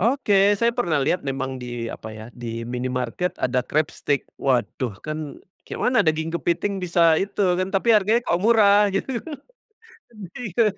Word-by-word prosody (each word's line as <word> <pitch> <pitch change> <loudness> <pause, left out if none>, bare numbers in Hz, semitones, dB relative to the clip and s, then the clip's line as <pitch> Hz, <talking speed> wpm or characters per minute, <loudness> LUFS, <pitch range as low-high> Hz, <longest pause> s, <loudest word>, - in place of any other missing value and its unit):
Oke 235 +1 +1 0.3
saya 235 +2 +2
pernah 170 -10 +1
lihat 180 - +1
memang 135 0 -2
di 120 -1 -5
apa 110 - -10
ya, 110 - -9
di 120 -1 -9 0.3
minimarket 125 +7 -2
ada 125 0 +1
crabstick 145 -2 0 0.2
waduh 125 -2 0
kan 155 0 -4 0.5
kayak - - -7
mana 250 -1 +3
daging 160 +1 0
kepiting 175 +4 -1
bisa 175 0 0 0.2
itu 200 +1 -5 0.2
kan 185 +1 -1
tapi 195 +4 +1
harganya 215 +4 +2
kok 170 - +1
murah 210 -3 +5
gitu, 195 - -1 1.3
iya. 230 -2 0
170 Hz, 150 wpm, -23 LUFS, 130-205 Hz, 1.3 s, murah